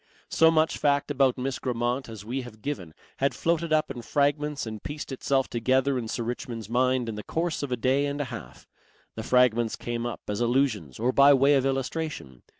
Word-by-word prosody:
So 160 - +5
much 160 0 +2
fact 145 0 +1
about 135 -3 +2
Miss 130 +1 -3
Grammont 125 +1 -2
as 110 -2 -9
we 130 +4 -3
have 110 -4 -12
given 90 - -5 0.2
had 140 +1 0
floated 170 -1 0
up 155 -2 +2
in 125 -3 -6
fragments 145 +2 0
and 110 -2 -6
pieced 145 -1 -6
itself 135 0 0
together 130 +3 +1
in 115 - -5
Sir 115 - -3
Richmond's 120 -2 -5
mind 125 +1 +1
in 115 - -3
the 105 0 -6
course 165 0 -2
of 145 -3 -4
a 125 - 0
day 135 +4 +2
and 140 +1 -3
a - - +1
half. 60 +1 -10 0.5
The 110 - -5
fragments 120 -1 +3
came 120 0 -3
up 120 - -6
as 105 +2 -2
allusions 120 - 0
or 120 +3 +1
by 140 +1 +7
way 135 +2 +4
of 135 -1 +3
illustration. 135 - -3
130 Hz, 205 wpm, -27 LUFS, 115-140 Hz, 0.5 s, by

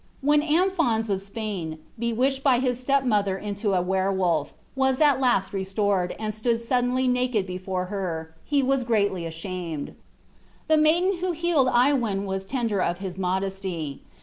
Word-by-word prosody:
When 295 +2 +4
Amphons 300 - +1
of 190 -1 0
Spain, 200 -6 -5 0.2
bewitched 250 +4 0
by 270 -3 +4
his 250 -1 0
step 275 +1 +2
mother 205 -6 +1
into 205 0 -2
a 180 - +2
were 190 +1 +1
wolf, 175 -6 0 0.2
was 265 -1 +1
at 290 -4 +4
last 240 -8 +1
restored, 195 -1 0
and 215 -1 -3
stood 230 +2 0
suddenly 250 +2 +1
naked 250 -5 +1
before 185 0 -3
her, 165 -5 -4
he 285 -2 +1
was 265 0 +1
greatly 200 -7 0
ashamed. 165 -2 -5 0.7
The 315 - +4
maiden 345 +5 +3
who 365 0 -1
healed 330 -5 +2
Iwein 240 -6 +2
was 195 0 -3
tender 225 -4 -1
of 175 -1 0
his 190 -2 -6
modesty. 190 -5 -3
215 Hz, 155 wpm, -25 LUFS, 190-260 Hz, 0.7 s, When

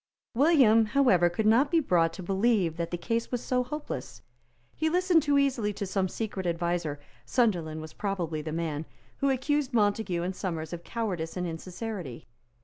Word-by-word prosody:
William, 255 -5 +5
however, 210 -8 +4
could 195 +5 -2
not 235 +7 +4
be 335 - +3
brought 170 - +2
to 185 - -8
believe 195 -2 +1
that 170 -1 -2
the 175 - -3
case 230 +6 -2
was 245 - 0
so 250 +1 0
hopeless. 135 - -6 0.5
He 315 +1 0
listened 360 -1 +3
too 290 -1 +2
easily 255 -7 +1
to 200 0 -4
some 190 0 0
secret 200 -4 -4
adviser, 170 -3 -1 0.2
Sunderland 160 - 0
was 155 0 -9
probably 175 -6 -2
the 155 +1 -5
man, 160 -1 -3 0.3
who 275 - +1
accused 275 +1 0
Montague 205 -5 +1
and 185 +1 -3
Somers 165 -4 -4
of 175 0 -6
cowardice 185 -8 -3
and 180 - -1
insincerity. 175 - -6
195 Hz, 170 wpm, -28 LUFS, 170-245 Hz, 0.5 s, William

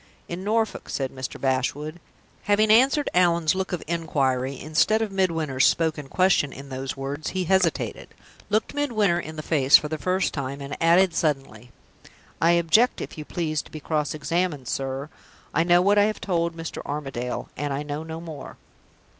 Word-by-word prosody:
"In 175 +2 -5
Norfolk," 220 +1 -1
said 135 -2 -2
Mr. 130 -1 -6
Bashwood. 140 +5 -1 0.5
Having 210 +1 +3
answered 270 +6 +4
Allan's 170 -3 +3
look 190 0 -3
of 180 - -3
inquiry, 135 -5 -1
instead 155 +8 +2
of 220 -2 -2
Midwinter's 165 -8 +2
spoken 160 -4 0
question, 180 -3 +2
in 140 +1 -10
those 130 +1 -5
words, 140 +3 -4
he 185 - +1
hesitated, 180 -1 0 0.4
looked 215 +1 0
Midwinter 215 -12 +1
in 155 -2 -7
the 155 - -6
face 140 -3 +6
for 150 - -5
the 155 0 -3
first 185 +3 0
time, 140 -1 -4
and 140 0 -6
added, 170 +2 +5
suddenly: 135 -6 -2 0.7
"I 170 +1 +5
object, 170 +9 +3
if - - -6
you 155 - -7
please, 155 -3 -2
to - - -17
be 155 - -8
cross 150 0 -1
examined, 155 -3 -1
sir. 135 +2 -3 0.4
I 165 - +3
know 175 +1 +4
what 205 +2 +4
I 205 - +5
have 215 0 -2
told 170 -3 -1
Mr. 165 -1 -6
Armadale, 135 -4 -4
and 145 0 -3
I 140 +2 -2
know 145 +1 -4
no 160 0 -6
more." 160 -3 -9
160 Hz, 175 wpm, -25 LUFS, 140-185 Hz, 0.7 s, face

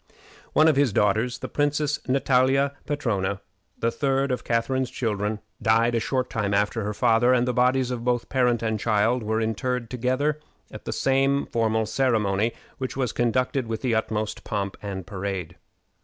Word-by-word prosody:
One 155 - +5
of 155 -4 +4
his 140 -4 +3
daughters, 110 +5 +1
the - - -6
Princess 145 0 0
Natalia 135 +1 +2
Petrowna, 100 -9 -1 0.4
the 115 - 0
third 135 +2 0
of 125 - -2
Catharine's 120 +2 0
children, 105 -2 -2 0.2
died 115 +2 +3
a 115 - +2
short 130 +2 -1
time 100 -2 -1
after 105 +2 0
her 105 +1 -2
father, 120 +1 +4
and 125 0 +1
the 125 - +1
bodies 125 +1 +2
of 120 -2 -4
both 120 -1 0
parent 125 -3 +1
and 110 -1 -1
child 115 +3 +2
were 110 +1 -1
interred 115 +2 -2
together 130 +5 0 0.3
at - - -10
the - - -3
same 135 +1 +2
funeral 110 -1 0
ceremony, 110 -3 +1 0.3
which 130 0 -4
was 130 -3 0
conducted 125 +2 0
with 110 +2 -4
the 125 -3 +1
utmost 110 -1 -2
possible 100 -2 -2
pomp - - -18
and 95 -3 -5
parade. 95 -3 -5
120 Hz, 170 wpm, -25 LUFS, 110-130 Hz, 0.4 s, One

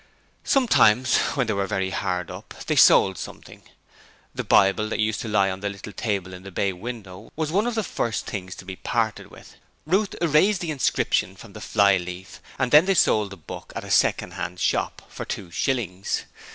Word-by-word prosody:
Sometimes, 130 - +4 0.2
when 130 -3 +1
they 110 - -1
were 100 -1 -1
very 95 0 -1
hard 90 -3 -2
up, - - -10
they - - 0
sold 95 -2 +6
something; - - -10 0.7
the - - -3
Bible 100 +2 +3
that - - -2
used 110 -1 0
to - - -5
lie 100 -3 +2
on 95 - -6
the 100 +1 -2
little 100 +1 -9
table 95 -3 -3
in 90 - -9
the 95 - -9
bay 95 +1 -1
window 100 -1 -8
was 155 -1 -2
one 205 +6 +1
of 240 - -2
the 220 - 0
first 115 - -2
things 95 -2 -6
to - - -11
be 95 0 -6
parted 115 -3 -2
with. - - -15 0.3
Ruth 195 +6 +1
erased 175 +5 +3
the 170 -3 -2
inscription 130 -8 0
from 100 +2 -13
the 110 - -10
fly 100 -3 +3
leaf 90 +1 -8 0.2
and 125 -1 0
then 150 +4 +7
they 195 0 +2
sold 105 - +3
the 100 - -10
book 80 - -10
at - - -4
a - - -7
second 90 - +2
hand 90 -1 -5
shop - - -1
for - - -7
two 90 -4 -6
shillings. 100 -6 -2
105 Hz, 205 wpm, -24 LUFS, 95-130 Hz, 0.7 s, then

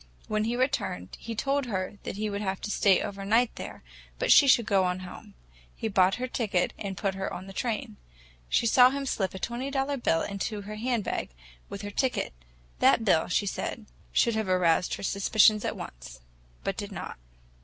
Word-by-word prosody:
When 215 0 0
he 235 +2 -1
returned, 170 - -1
he 230 -1 -6
told 275 +3 0
her 195 -1 -3
that - - -4
he 215 +1 -2
would 200 0 -3
have 190 -2 -2
to 210 - -4
stay 195 -3 +4
overnight 205 +4 +1
there, - - -8 0.3
but - - +1
she 280 - +8
could 235 -3 +5
go 195 -2 +3
on 180 0 -1
home. 180 - -11 0.4
He 225 - -3
bought 190 -1 +4
her 250 - -3
ticket 210 -8 0
and 195 -2 -5
put 195 -2 -1
her 195 0 -4
on 185 - -6
the 195 - -10
train. 225 +1 -3 0.5
She - - +2
saw 250 +2 +7
him 275 +1 -3
slip 195 -7 -1
a - - -4
twenty 240 +7 -3
dollar 275 +1 -1
bill 165 -9 +1
into 205 +1 -3
her 210 +1 -7
handbag 235 -2 -1 0.4
with 200 - -7
her 205 - -5
ticket. 255 - -1 0.5
That 225 - +4
bill, 165 -6 +3
she 190 +3 +1
said, 210 +2 -4 0.3
should 235 - +3
have 220 -3 -1
aroused 180 -1 +2
her - - -9
suspicions 210 +2 +4
at - - -2
once—but - - -8
did - - -5
not. - - -6
205 Hz, 195 wpm, -28 LUFS, 190-235 Hz, 0.5 s, she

